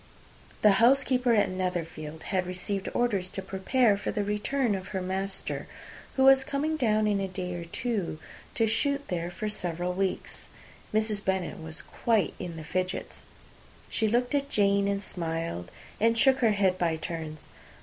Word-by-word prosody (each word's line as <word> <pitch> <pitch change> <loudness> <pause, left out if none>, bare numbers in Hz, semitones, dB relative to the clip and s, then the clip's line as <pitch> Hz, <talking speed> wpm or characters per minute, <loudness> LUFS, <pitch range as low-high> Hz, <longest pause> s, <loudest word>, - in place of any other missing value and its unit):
The 210 -2 +6
housekeeper 255 -1 +4
at 205 - +3
Netherfield 165 -4 -3
had 185 -2 -1
received 190 +2 -3
orders 200 -7 +1
to 195 - -5
prepare 200 +4 +2
for - - -4
the 210 - -1
arrival 210 +3 0
of 190 0 -6
her 190 - -3
master, 190 +1 -2 0.5
who 265 - +3
was 270 0 +7
coming 295 +4 -1
down 215 -7 +2
in 205 -1 +2
a 195 - -1
day 180 -1 -4
or 170 -1 -5
two, 200 -2 -2 0.4
to 225 - +3
shoot 280 +6 0
there 175 -1 -2
for 190 +5 -4
several 180 -3 -2
weeks. 190 0 -2 0.5
Mrs. 215 -1 +1
Bennet 190 -3 -1
was 160 -1 -5
quite 225 -4 +1
in 170 -2 -5
the 160 - -6
fidgets. 185 +3 -3 0.6
She 220 - +1
looked 245 +4 +1
at 280 -1 +1
Jane, 200 -3 +3
and 200 0 -1
smiled, 165 - -3 0.3
and 230 +1 +3
shook 265 +2 +5
her 225 -4 +4
head, 190 -2 +2
by 165 -2 +2
turns. 160 -1 -5
195 Hz, 165 wpm, -28 LUFS, 180-225 Hz, 0.6 s, was